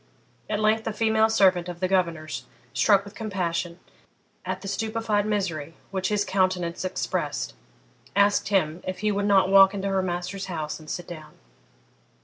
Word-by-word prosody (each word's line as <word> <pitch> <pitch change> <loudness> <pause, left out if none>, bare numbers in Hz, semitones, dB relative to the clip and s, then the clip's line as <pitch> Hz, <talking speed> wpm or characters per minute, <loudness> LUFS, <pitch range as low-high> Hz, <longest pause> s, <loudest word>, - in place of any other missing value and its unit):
At 210 -1 0
length 215 +1 +2
a 220 - -1
female 220 0 +3
servant 185 -4 +3
of 175 -1 -7
the 185 - +1
governor's, 170 -5 -1 0.3
struck 200 -2 +4
with 200 - -11
compassion, 180 -5 -3 0.7
at - - -4
the 195 - -7
stupefied 220 0 -1
misery 165 -7 -2 0.2
which 190 -1 -1
his 205 -1 +1
countenance 185 -3 0
expressed, 185 0 -2 0.6
asked 200 0 +3
him 180 -4 +1
if 185 0 -4
he 215 0 +2
would 200 0 0
not 195 -2 +4
walk 195 0 +7
into 200 0 -2
her 195 -1 +1
master's 185 +2 -3
house 155 -4 -4
and 155 -1 -13
sit 175 - -4
down? 155 -3 -10
190 Hz, 160 wpm, -25 LUFS, 175-205 Hz, 0.7 s, walk